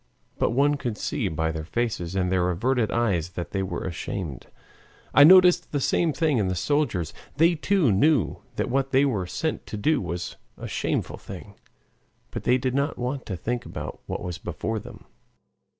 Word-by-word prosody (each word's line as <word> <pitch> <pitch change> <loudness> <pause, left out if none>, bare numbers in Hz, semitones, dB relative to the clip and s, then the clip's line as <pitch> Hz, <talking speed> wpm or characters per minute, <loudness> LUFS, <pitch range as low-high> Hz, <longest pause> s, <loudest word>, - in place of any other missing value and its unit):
But - - +2
one 145 +4 +2
could 120 -5 -3
see - - -2
by 80 +1 -1
their 80 -1 -4
faces 95 -1 -2
and 90 -1 +1
their 90 -1 +2
averted 115 +5 +1
eyes 100 -9 0
that 85 +1 -5
they 95 - -1
were 95 - -3
ashamed. 85 -4 -5 0.7
I 145 - +8
noticed 180 +1 +7
the 145 - 0
same 160 +4 +2
thing 150 -4 +1
in 100 - +1
the 95 - -1
soldiers. 100 - 0 0.2
They 165 +3 +5
too 170 - +2
knew 135 +4 +3 0.2
that - - -1
what 135 +1 +1
they 135 +1 +4
were 105 -10 -1
sent 160 - -3
to 105 - -5
do 145 +8 +2
was 85 -1 -4 0.2
a - - -6
shameful - - -2
thing, - - -10 0.8
but - - -6
they 125 - +4
did 130 0 -1
not 140 +2 0
want 125 +2 -3
to 95 - -3
think 120 +6 -2
about - - -7
what - - -4
was 90 -1 -5
before 110 -1 -3
them. - - -12
120 Hz, 185 wpm, -25 LUFS, 90-145 Hz, 0.8 s, I